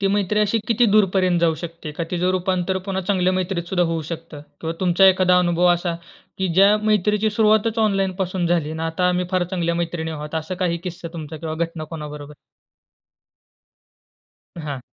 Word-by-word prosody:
ती 195 - +1
मैत्री 205 +1 +1
अशी 210 +2 +2
किती 235 +1 +3
दूर 210 0 +5
पर्यंत 180 -2 +2
जाऊ 165 -2 +3
शकते? 165 -2 -7
का 165 +2 -3
तिचं 180 +1 +1
रूपांतर 185 0 0
पुन्हा 190 -1 -1
चांगल्या 185 -1 +1
मैत्रीत 185 -2 -2
सुद्धा 180 -2 +1
होऊ 165 -1 -2
शकतं? 165 -2 -7 0.2
किंवा 165 0 -3
तुमचा 185 +1 +4
एखादा 185 -1 +5
अनुभव 175 0 +2
असा, 175 -1 -2 0.4
की 190 -1 0
ज्या 200 +3 +6
मैत्रीची 210 0 +2
सुरुवातच 220 +1 +2
ऑनलाईन 195 -3 +1
पासून 180 -1 -2
झाली 165 -3 0
आणि 160 +1 -5
आता 165 +3 0
आम्ही 180 0 0
फार 185 -1 +1
चांगल्या 170 -2 -1
मैत्रिणी 170 -1 -3
आहोत 150 0 -6
असा 160 +3 -3
काही 170 -1 0
किस्सा 175 -1 -6
तुमचा 160 -1 -6
किंवा 160 0 -5
घटना 165 -1 -3
कोणाबरोबर? 150 -2 -8 2.2
हां. 145 -4 -5
180 Hz, 175 wpm, -21 LUFS, 165-190 Hz, 2.2 s, ज्या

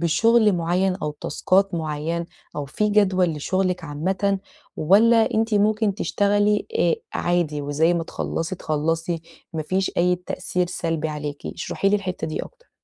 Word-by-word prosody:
بشُغل 220 +6 +4
معيّن 180 +2 +1
أو 150 - -1
تاسكات 195 0 +1
معيّنة 160 +1 -2 0.3
أو 145 - -2
في 210 +10 -1
جدول 190 -4 +3
لشُغلِك 185 +3 -1
عامةً 190 +6 -1 0.4
والّا 220 +7 +4
أنتِ 225 0 +1
ممكن 210 0 +2
تشتغلي 205 0 +1
آآ 170 -1 +3 0.2
عادي 170 -4 0
وزي 155 +4 +2
ما 170 -1 -1
تخلّصي 165 +2 -3
تخلّصي، 165 +2 -1 0.3
ما 160 -2 -2
فيش 190 +4 0
أي 180 +1 +3
تأثير 180 0 -2
سلبي 165 -2 -2
عليكِ؟ 150 -1 -5
اشرحي 180 +3 -2
لي 205 - +3
الحِتّة 185 -3 -4
دي 155 - -3
أكتر. - - -13
180 Hz, 145 wpm, -23 LUFS, 160-200 Hz, 0.4 s, بشُغل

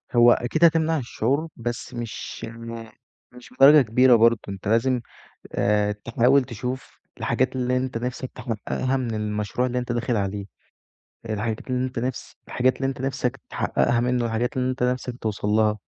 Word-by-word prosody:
هو 120 0 +7
أكيد 155 +9 +2
هتمنع 160 -1 +3
الشعور، 135 +4 -1
بس 120 +2 -5
مش 120 -2 -6
م 115 0 -8 0.5
مش 125 0 -14
بدرجة 140 +3 +8
كبيرة 125 +2 +5
برضه. 115 0 +4
أنت 95 0 -7
لازم 120 +3 +2 0.5
آآ 105 0 +2
تحاول 120 +6 +2
تشوف 125 +2 -6 0.2
الحاجات 130 0 0
اللي 125 0 0
أنت 130 -2 -2
نفسك 125 +2 -4
تحققها 130 +2 -2
من 120 -3 -2
المشروع 105 +3 -1
اللي 125 0 -1
أنت 125 0 -4
داخل 120 0 -1
عليه، 100 -1 -2 0.9
الحاجات 110 +3 -3
اللي 125 0 0
أنت 130 -2 -6
نفس 125 +1 -4
الحاجات 130 +1 +1
اللي 135 - -1
أنت 135 -1 -4
نفسك 135 0 -2
تحققها 120 0 +1
منّه، 125 0 +1
والحاجات 120 +4 -1
اللي 130 0 +1
أنت 130 -1 -4
نفسك 125 0 -1
توصّل 105 -1 -2
لها، 105 0 +2
120 Hz, 160 wpm, -24 LUFS, 115-130 Hz, 0.9 s, بدرجة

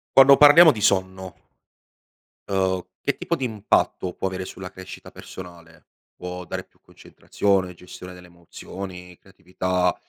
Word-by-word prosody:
Quando 135 +1 +8
parliamo 155 +2 +8
di 110 - -7
sonno 95 -2 -1 1.1
uhm, 95 -1 0 0.2
che - - -1
tipo - - -2
di 135 - -4
impatto 105 -5 -1
può - - -4
avere 95 0 -6
sulla 95 -1 -9
crescita 95 0 -11
personale? 85 -3 -13 0.3
Può 90 0 -7
dare - - -5
più - - -36
concentrazione, 95 -3 -2
gestione 90 +1 -12
delle 90 0 -15
emozioni, 90 +1 -10
creatività? 90 -1 -2
95 Hz, 130 wpm, -23 LUFS, 90-95 Hz, 1.1 s, Quando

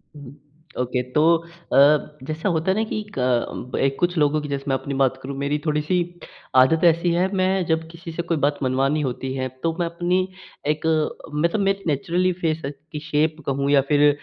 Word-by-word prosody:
उहुँ, 140 -2 -11 0.5
ओके 125 0 0
तो 150 - +3 0.5
अ, 150 +2 +4
जैसा 155 +7 -2
होता 170 +2 +1
है 195 - 0
ना 220 - +2
कि 215 - -2 0.2
क 125 0 -1
बे 135 - +2
कुछ 175 -1 +1
लोगों 150 0 +2
की 150 - -6
जैसे 140 -1 -3
मैं 135 - +2
अपनी 140 +2 -4
बात 135 -1 +2
करूँ, 135 +1 -5
मेरी 140 +2 0
थोड़ी-सी 150 +4 +1 0.6
आदत 130 +7 +5
ऐसी 170 +1 +4
है। 180 +2 +2
मैं 185 -1 +1
जब 160 0 0
किसी 170 0 -9
से 170 - -3
कोई 170 -2 -1
बात 145 0 0
मनवानी 135 +4 +1
होती 130 0 -3
है 130 -1 -1 0.2
तो 165 -1 +1
मैं 170 - +1
अपनी 180 +2 0 0.5
एक 155 - -10 0.5
मै 150 +3 +2
तो 215 - -1
मैं 195 0 +2
नेचुरली 175 +5 +1
फेस 160 -1 0 0.3
की 150 - -4
शेप 155 0 0
कहूँ 140 0 0
या 140 -1 +6
फिर 145 0 +5
150 Hz, 200 wpm, -23 LUFS, 140-170 Hz, 0.6 s, या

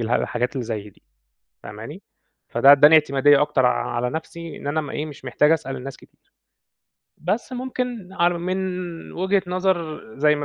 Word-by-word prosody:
اله 115 +1 0
الحاجات 125 +3 -2
اللي 130 -4 -4
زَي 105 -2 -5
دي - - -28 0.6
فاهماني؟ - - -9 0.5
فده 135 +4 +6
ادّاني 145 +2 +8
اعتمادية 145 -1 +4
أكتر 130 -3 +2
ع 125 - +1
على 125 +1 0
نَفْسي 165 +1 -7
إن - - -7
أنا 155 +2 0
م 145 - -7
إيه، 150 - -3
مش 145 -3 -11
محتاج 150 +4 +3
أسأل 150 -4 0
الناس 135 +1 -8
كتير. - - -24 0.9
بس 205 - -2
ممكن 250 -6 -4
على 175 -1 +1
من 180 -1 -4
وجهة 190 +1 +1
نظر 180 -4 -1 0.2
زَي 150 +1 +4
ما 145 - -3
155 Hz, 170 wpm, -22 LUFS, 135-180 Hz, 0.9 s, ادّاني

